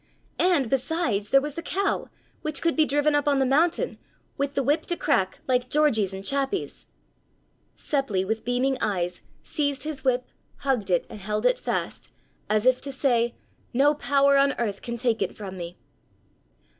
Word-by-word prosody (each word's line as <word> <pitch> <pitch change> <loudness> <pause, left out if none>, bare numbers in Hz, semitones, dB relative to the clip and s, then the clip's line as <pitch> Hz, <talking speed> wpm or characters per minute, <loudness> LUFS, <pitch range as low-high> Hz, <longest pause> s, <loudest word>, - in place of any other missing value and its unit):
And, 350 -8 +3
besides, 255 - 0
there 275 - +5
was 295 +1 -4
the 335 - -5
cow, 390 +3 -1 0.3
which 310 -1 -3
could 335 -1 +2
be 315 - +4
driven 290 +1 +2
up 290 0 +1
on 285 -1 +3
the 270 - +3
mountain, 325 - +1 0.4
with 280 0 -2
the 275 - +1
whip 295 +5 +1
to 345 - -1
crack, 190 0 0
like 250 -1 +1
Georgie's 240 -10 +2
and 190 0 -7
Chappi's! 280 +7 -2 0.9
Seppli, 230 -10 0
with 220 +2 -2
beaming 255 +2 0
eyes, 180 -5 -1 0.2
seized 285 -3 -1
his 305 -2 -4
whip, 255 -1 0 0.3
hugged 250 -8 0
it 175 -2 +2
and 215 - -10
held 210 +2 -2
it - - +3
fast, - - -3 0.4
as 215 +1 +2
if 255 0 +4
to 280 - -4
say: 240 -3 +1 0.4
"No 285 +3 +5
power 280 -1 +3
on 275 0 +4
earth 205 -4 -3
can 235 0 -4
take 235 -2 0
it - - -2
from 195 -3 -7
me!" 175 -1 -7
270 Hz, 175 wpm, -25 LUFS, 220-290 Hz, 0.9 s, there